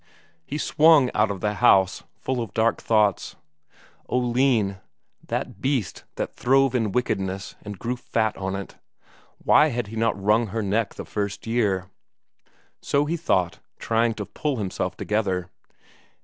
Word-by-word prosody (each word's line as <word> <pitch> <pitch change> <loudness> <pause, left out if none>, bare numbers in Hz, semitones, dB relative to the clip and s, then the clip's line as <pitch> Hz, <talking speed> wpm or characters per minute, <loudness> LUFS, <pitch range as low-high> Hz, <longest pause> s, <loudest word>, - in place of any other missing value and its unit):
He 145 - -3
swung 155 -3 +4
out 105 0 +2
of 100 -3 -4
the 105 0 0
house, 95 -1 +4
full 130 -2 -3
of 110 -3 -7
dark 115 +1 +2
thoughts. 105 -4 +1 0.7
Oline, 120 -5 +1 0.5
that - - -4
beast 130 - -1
that - - -3
throve 135 +1 +3
in 115 -5 0
wickedness 95 -4 -2
and 105 -1 -8
grew 120 +5 -3
fat 110 -3 -1
on 95 0 -3
it 100 0 -7 0.6
why 150 - +5
had 120 -6 -3
he 115 - -8
not 115 -2 0
wrung 105 +4 +2
her 110 +2 -3
neck 105 +2 -1
the - - -7
first 100 -1 -4
year? 105 -5 0 1.0
So 145 +1 +1
he 160 +3 -1
thought, 90 - 0 0.2
trying 115 0 +1
to 105 - -5
pull 150 +6 -2
himself 100 -4 -3
together. 95 -4 -1
110 Hz, 150 wpm, -24 LUFS, 100-125 Hz, 1.0 s, why